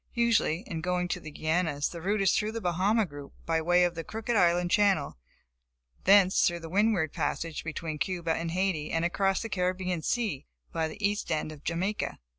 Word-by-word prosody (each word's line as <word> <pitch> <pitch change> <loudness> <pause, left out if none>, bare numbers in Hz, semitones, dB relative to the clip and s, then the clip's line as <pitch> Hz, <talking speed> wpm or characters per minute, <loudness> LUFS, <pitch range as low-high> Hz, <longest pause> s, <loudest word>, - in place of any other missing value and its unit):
Usually, 230 -7 +2
in 165 -7 -5
going 180 +1 -1
to - - -2
the 155 - -9
Guianas, 155 -1 0
the 170 - -7
route 200 +4 0
is 190 - +3
through 215 +1 0
the 230 - -3
Bahama 195 +4 +1
group, 145 -4 -10
by 165 -1 +1
way 175 +2 +4
of 175 -1 +1
the 165 -1 -5
Crooked 225 +4 -3
Island 175 -2 +3
Channel, 195 -9 +2 0.9
thence 195 -1 +6
through 175 -1 -2
the 165 - -8
Windward 200 -6 +2
Passage, 165 -2 -2
between 160 -1 -5
Cuba 170 -1 -1
and 165 +1 -3
Haiti 175 -3 -1
and 165 +1 0
across 195 +3 +1
the - - -3
Caribbean 180 -2 -1
sea 210 - -2 0.2
by 160 -1 -1
the 155 - -9
east 205 +1 -3
end 155 0 -1
of 150 -2 -12
Jamaica. 185 +6 -2
175 Hz, 195 wpm, -29 LUFS, 160-195 Hz, 0.9 s, thence